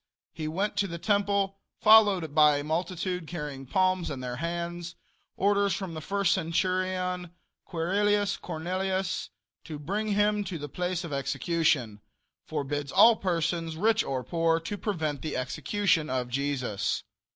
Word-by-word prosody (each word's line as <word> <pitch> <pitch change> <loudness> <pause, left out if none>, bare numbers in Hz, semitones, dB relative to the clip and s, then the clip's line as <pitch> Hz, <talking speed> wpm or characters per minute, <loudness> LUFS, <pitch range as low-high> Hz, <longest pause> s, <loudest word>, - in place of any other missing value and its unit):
He 155 - -4
went 190 +7 -2
to 200 - +2
the 170 -2 -5
temple 200 0 +1 0.2
followed 205 -8 +6
by 150 -1 +6
a 145 - -3
multitude 180 +2 -2
carrying 145 -5 -6
palms 185 +2 +1
in 140 -3 -4
their 125 -1 -4
hands. 170 +2 -4 0.4
Orders 200 0 +2
from 190 -4 -5
the 155 - -5
first 200 +2 +1
centurion 180 0 -1 0.3
Quirrillis 200 +4 +1
Cornelius 185 +3 -2 0.3
to 155 -2 -7
bring 200 +9 -2
him 205 0 +2
to 185 -3 -4
the 145 -1 -6
place 180 +4 -2
of 165 -4 -6
execution. 140 - 0 0.5
Forbids 145 -1 -3
all 225 +4 +7
persons, 165 -2 -1
rich 220 +4 +3
or 130 -2 -3
poor, 165 +4 +1
to 170 +5 -4
prevent 160 -8 -2
the 155 - -3
execution 155 +6 0
of 125 -1 -1
Jesus. 125 -6 -1
170 Hz, 140 wpm, -28 LUFS, 150-195 Hz, 0.5 s, all